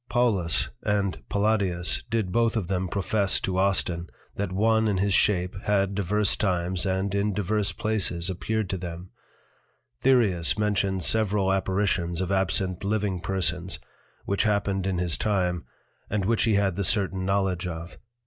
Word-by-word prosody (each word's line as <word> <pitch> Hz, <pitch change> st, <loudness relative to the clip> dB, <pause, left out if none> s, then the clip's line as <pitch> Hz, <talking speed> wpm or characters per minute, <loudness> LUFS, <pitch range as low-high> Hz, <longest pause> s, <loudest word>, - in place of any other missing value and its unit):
Paulus 105 Hz, -9 st, +1 dB
and 100 Hz, -4 st, -1 dB
Palladius 100 Hz, -5 st, +1 dB
did 110 Hz, -5 st, -1 dB
both 115 Hz, +1 st, +2 dB
of 100 Hz, -6 st, -2 dB
them 95 Hz, -1 st, -1 dB
profess 100 Hz, +1 st, +1 dB
to 95 Hz, -1 st, -1 dB
Austin, 90 Hz, -3 st, +1 dB, 0.3 s
that 100 Hz, -2 st, -3 dB
one 110 Hz, +3 st, +2 dB
in 100 Hz, -3 st, +1 dB
his 100 Hz, +1 st, +1 dB
shape, 90 Hz, -3 st, +2 dB
had 100 Hz, -1 st, +1 dB
divers 100 Hz, +1 st, +1 dB
times, 90 Hz, -2 st, 0 dB
and 95 Hz, +1 st, -1 dB
in 100 Hz, 0 st, 0 dB
divers 105 Hz, 0 st, 0 dB
places 90 Hz, -4 st, 0 dB
appeared 105 Hz, +3 st, -2 dB
to 95 Hz, -, -2 dB
them: 85 Hz, +1 st, -7 dB, 0.9 s
Thyreus 110 Hz, -11 st, +3 dB
mentions 100 Hz, -3 st, 0 dB
several 105 Hz, -3 st, +2 dB
Apparitions 95 Hz, -3 st, 0 dB
of 95 Hz, 0 st, -1 dB
absent 95 Hz, -1 st, 0 dB
living 100 Hz, -2 st, -1 dB
persons, 90 Hz, -1 st, -2 dB, 0.5 s
which 100 Hz, -, 0 dB
happened 100 Hz, -3 st, 0 dB
in 95 Hz, -2 st, -1 dB
his 85 Hz, -2 st, 0 dB
time, 90 Hz, -5 st, 0 dB, 0.4 s
and 100 Hz, -2 st, -1 dB
which 115 Hz, +2 st, +2 dB
he 110 Hz, -3 st, +2 dB
had 100 Hz, -3 st, +1 dB
the 100 Hz, -, 0 dB
certain 95 Hz, -1 st, +2 dB
knowledge 95 Hz, -2 st, 0 dB
of. 85 Hz, 0 st, -7 dB
95 Hz, 150 wpm, -26 LUFS, 90-105 Hz, 0.9 s, Thyreus